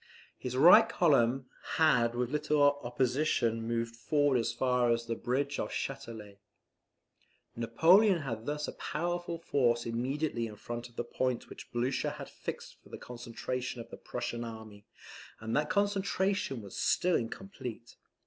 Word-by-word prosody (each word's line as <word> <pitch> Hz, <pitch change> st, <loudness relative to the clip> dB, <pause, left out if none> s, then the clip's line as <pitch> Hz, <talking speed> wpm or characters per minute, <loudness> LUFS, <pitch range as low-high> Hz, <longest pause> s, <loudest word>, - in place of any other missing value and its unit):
His 125 Hz, 0 st, -4 dB
right 165 Hz, +7 st, +8 dB
column 135 Hz, -5 st, +3 dB, 0.3 s
had 125 Hz, -7 st, +3 dB
with 125 Hz, 0 st, -1 dB
little 150 Hz, 0 st, +2 dB, 0.2 s
opposition 125 Hz, -2 st, +1 dB
moved 115 Hz, 0 st, -2 dB
forward 145 Hz, +2 st, +2 dB
as 115 Hz, -, 0 dB
far 125 Hz, -2 st, +1 dB
as 115 Hz, 0 st, +1 dB
the 115 Hz, -, -2 dB
bridge 135 Hz, +5 st, -1 dB
of -, -, -2 dB
Chatelet. 105 Hz, -3 st, -6 dB, 1.2 s
Napoleon 170 Hz, -, +4 dB
had 115 Hz, -4 st, -5 dB
thus 150 Hz, 0 st, -2 dB
a -, -, -3 dB
powerful 175 Hz, +1 st, -3 dB
force 120 Hz, -7 st, +1 dB
immediately 120 Hz, +1 st, -1 dB
in 105 Hz, -, -9 dB
front 120 Hz, +2 st, -6 dB
of 120 Hz, -, -24 dB
the 120 Hz, -, -2 dB
point 125 Hz, 0 st, -2 dB
which -, -, -11 dB
Blucher 125 Hz, +2 st, 0 dB
had -, -, -8 dB
fixed -, -, -7 dB
for -, -, -19 dB
the -, -, -7 dB
concentration 125 Hz, +1 st, -5 dB
of 115 Hz, -, -9 dB
the -, -, -8 dB
Prussian 120 Hz, -1 st, -4 dB
army, 110 Hz, -3 st, -9 dB, 0.5 s
and 110 Hz, +1 st, -3 dB
that 150 Hz, 0 st, +1 dB
concentration 195 Hz, -, 0 dB
was 100 Hz, -, -10 dB
still 180 Hz, 0 st, +2 dB
incomplete. 120 Hz, -, -5 dB
125 Hz, 150 wpm, -31 LUFS, 115-150 Hz, 1.2 s, right